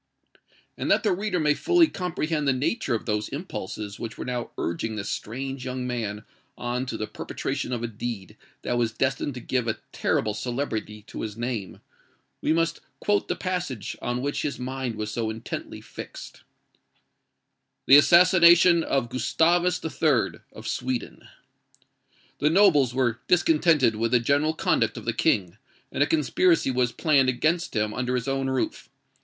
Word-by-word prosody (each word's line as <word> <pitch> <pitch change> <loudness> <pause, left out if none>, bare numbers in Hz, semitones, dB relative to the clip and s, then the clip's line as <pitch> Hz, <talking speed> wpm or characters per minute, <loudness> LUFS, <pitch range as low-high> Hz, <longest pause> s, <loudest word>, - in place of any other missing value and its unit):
And - - -2
that - - +3
the 210 - +2
reader 195 0 -1
may 150 -1 +3
fully 350 - +4
comprehend 165 - -2
the 135 - +4
nature 135 - -1
of 110 - -4
those 105 -1 -1
impulses 110 - -6
which 115 -1 -6
were - - -5
now 125 -1 -3
urging 95 +7 -2
this 105 -1 -4
strange 135 +4 -5
young 125 -1 -4
man 110 -4 -3 0.3
on 125 +2 -3
to 115 - -4
the 110 - -2
perpetration - - -4
of 120 -2 -2
a - - 0
deed 110 -3 -6 0.3
that 120 - 0
was 115 -2 +1
destined 135 +2 -1
to - - -5
give 125 0 -1
a 110 - -1
terrible 105 -1 0
celebrity 110 -2 -4
to - - -8
his 110 -1 -5
name, 115 -6 -4 0.6
we - - +1
must 165 +1 +1 0.2
quote 205 0 +1
the - - -1
passage 180 - -3
on 120 +1 -2
which 145 +1 -1
his 145 - -3
mind 130 -2 -4
was 105 0 -4
so 110 0 -2
intently 110 +1 -6
fixed:— - - -10 1.4
"THE 135 - +9
ASSASSINATION 170 +1 +7
OF 135 -6 0
GUSTAVUS 165 +9 +1
III., 150 -6 +1
OF - - -10
SWEDEN. 130 -1 -3 1.1
"The 150 - +3
nobles 155 -9 +4
were 120 -3 +1
discontented 160 -9 +3
with 115 +1 0
the 125 - +4
general 145 +6 +1
conduct - - +1
of - - -8
the - - 0
King; 90 -1 +1 0.3
and - - -2
a 145 - +5
conspiracy 160 0 +2
was 125 -1 +1
planned 140 -4 +3
against 160 +7 0
him 105 0 0
under 125 +1 -1
his 125 +1 -2
own 135 0 0
roof. 130 -1 -2
130 Hz, 165 wpm, -25 LUFS, 115-155 Hz, 1.4 s, THE